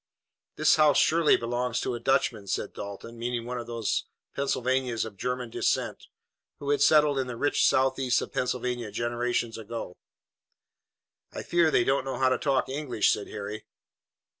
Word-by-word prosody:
"This 155 +1 +4
house 150 -2 +5
surely 165 -1 +4
belongs 120 0 -2
to - - -2
a 120 - -4
Dutchman," 115 -4 0
said - - -2
Dalton, 100 +3 -8
meaning 120 0 -2
one 125 0 -4
of 120 - -7
those 115 -3 -1 0.3
Pennsylvanians 130 -3 0
of 110 -2 -9
German 125 +3 -3
descent - - -1 0.5
who 145 0 -3
had 145 - +1
settled 150 -2 +5
in 130 - -1
the 125 - -5
rich 145 +4 +1
southeast 130 -1 +3
of - - -6
Pennsylvania 125 -2 -2
generations 120 +1 -2
ago. 110 -4 -6 1.4
"I - - -6
fear 170 -2 +3
they 125 - +3
don't 135 +2 +1
know 135 - -3
how 130 -1 +3
to 130 - 0
talk 135 -5 +1
English," 135 -5 +1
said 105 - -2
Harry. 105 +1 -6
125 Hz, 165 wpm, -27 LUFS, 115-135 Hz, 1.4 s, house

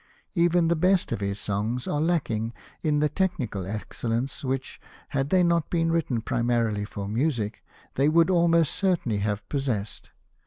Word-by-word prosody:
Even 175 -1 +3
the 170 - +3
best 185 +3 +2
of - - -1
his 100 0 -2
songs 105 +6 -2
are 150 - 0
lacking 120 -9 0 0.3
in 150 -2 +1
the 150 - +4
technical 135 - -2
excellence 115 +5 -3
which, 130 0 -3 0.3
had 135 0 -1
they 185 +1 +4
not 170 -2 +2
been 165 -1 +1
written 145 -8 0
primarily 115 -4 0
for 100 -1 -6
music, 115 -2 -1 0.3
they 140 +3 +3
would 165 +3 +4
almost 170 -3 +3
certainly 175 - 0
have 105 0 -2
possessed. 125 -8 -3
135 Hz, 155 wpm, -26 LUFS, 110-165 Hz, 0.3 s, the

